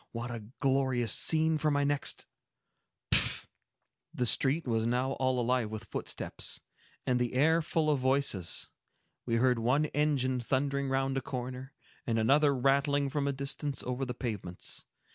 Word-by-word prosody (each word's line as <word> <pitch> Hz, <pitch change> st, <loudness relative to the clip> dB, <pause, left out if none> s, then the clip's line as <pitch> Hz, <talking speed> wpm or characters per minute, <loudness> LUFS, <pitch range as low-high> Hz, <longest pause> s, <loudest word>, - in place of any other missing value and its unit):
What 120 Hz, +1 st, -4 dB
a 115 Hz, -3 st, -6 dB
glorious 130 Hz, -4 st, +2 dB
scene 160 Hz, -1 st, +2 dB
for 155 Hz, -, +1 dB
my 145 Hz, -1 st, +1 dB
next—Pshaw!" 145 Hz, -1 st, -1 dB, 0.7 s
The 125 Hz, -, 0 dB
street 135 Hz, +6 st, +2 dB
was 115 Hz, -1 st, +1 dB
now 125 Hz, +2 st, 0 dB
all 130 Hz, -1 st, 0 dB
alive 120 Hz, -2 st, +1 dB
with 110 Hz, 0 st, -6 dB
footsteps, -, -, -3 dB, 0.5 s
and 125 Hz, -1 st, +1 dB
the 125 Hz, 0 st, -1 dB
air 160 Hz, +5 st, +4 dB
full 155 Hz, 0 st, 0 dB
of 150 Hz, -3 st, +2 dB
voices. 130 Hz, -9 st, 0 dB, 0.6 s
We 115 Hz, -, +1 dB
heard 125 Hz, 0 st, +3 dB
one 130 Hz, +7 st, +2 dB
engine 135 Hz, -4 st, +1 dB
thundering 140 Hz, +2 st, -1 dB
round 135 Hz, 0 st, 0 dB
a -, -, 0 dB
corner, 130 Hz, +2 st, -6 dB, 0.3 s
and 115 Hz, -2 st, +1 dB
another 140 Hz, +6 st, +4 dB
rattling 140 Hz, +2 st, +2 dB
from 140 Hz, -1 st, -1 dB
a -, -, +2 dB
distance 140 Hz, +1 st, -3 dB
over 125 Hz, +1 st, -3 dB
the 125 Hz, -2 st, -4 dB
pavements. 105 Hz, -8 st, -4 dB
130 Hz, 150 wpm, -31 LUFS, 125-140 Hz, 0.7 s, air